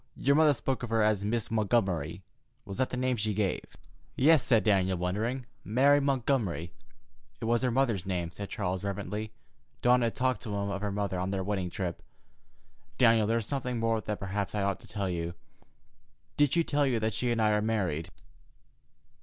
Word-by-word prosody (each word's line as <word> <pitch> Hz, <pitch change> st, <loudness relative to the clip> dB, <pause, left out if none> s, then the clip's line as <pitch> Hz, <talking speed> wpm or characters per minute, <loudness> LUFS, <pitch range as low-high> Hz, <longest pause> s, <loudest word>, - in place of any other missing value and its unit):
Your 140 Hz, +2 st, +2 dB
mother 150 Hz, -2 st, +5 dB
spoke 130 Hz, +2 st, -2 dB
of 120 Hz, -, -4 dB
her 115 Hz, -1 st, +2 dB
as 105 Hz, -2 st, +2 dB
Miss 115 Hz, +2 st, -1 dB
Montgomery. 95 Hz, -7 st, 0 dB, 0.4 s
Was 100 Hz, -3 st, -7 dB
that 130 Hz, -, +1 dB
the 125 Hz, -, -4 dB
name 130 Hz, -1 st, 0 dB
she 105 Hz, -1 st, -1 dB
gave?" 100 Hz, -2 st, 0 dB, 0.5 s
"Yes," 155 Hz, +2 st, +5 dB
said 120 Hz, -5 st, +3 dB
Daniel, 95 Hz, -3 st, +2 dB
wondering; 110 Hz, +9 st, -2 dB, 0.2 s
"Mary 135 Hz, +7 st, +4 dB
Montgomery." 125 Hz, -, 0 dB, 0.7 s
"It -, -, -4 dB
was 115 Hz, +1 st, +2 dB
her 130 Hz, -, +2 dB
mother's 120 Hz, -6 st, +1 dB
name," 90 Hz, -3 st, -2 dB
said 100 Hz, +2 st, -7 dB
Charles 95 Hz, -2 st, -2 dB
reverently. 105 Hz, +2 st, -4 dB, 0.5 s
Dawn 125 Hz, 0 st, +5 dB
had 115 Hz, -1 st, 0 dB
talked 130 Hz, -3 st, 0 dB
to 105 Hz, -2 st, -4 dB
him 100 Hz, 0 st, -2 dB
of 100 Hz, -, -3 dB
her 105 Hz, -1 st, -2 dB
mother 100 Hz, -2 st, -2 dB
on 90 Hz, +1 st, -1 dB
their 95 Hz, -1 st, -1 dB
wedding 95 Hz, -2 st, -2 dB
trip. 85 Hz, -1 st, -4 dB, 1.0 s
"Daniel, 115 Hz, -4 st, +5 dB
there 115 Hz, +1 st, +2 dB
is 115 Hz, -, -2 dB
something 125 Hz, -3 st, -2 dB
more 115 Hz, -1 st, +1 dB
that 105 Hz, -1 st, -4 dB
perhaps 100 Hz, +1 st, -3 dB
I 105 Hz, -, 0 dB
ought 100 Hz, -2 st, 0 dB
to -, -, -15 dB
tell 100 Hz, -2 st, -3 dB
you. 85 Hz, -1 st, -3 dB, 1.0 s
Did 145 Hz, -2 st, +3 dB
she 170 Hz, 0 st, +3 dB
tell 145 Hz, -2 st, +1 dB
you 120 Hz, -3 st, +1 dB
that 110 Hz, 0 st, -1 dB
she 120 Hz, +3 st, -1 dB
and 120 Hz, -1 st, 0 dB
I 110 Hz, -1 st, +3 dB
are 105 Hz, 0 st, +2 dB
married?" 95 Hz, -7 st, -1 dB
110 Hz, 195 wpm, -29 LUFS, 95-125 Hz, 1.0 s, mother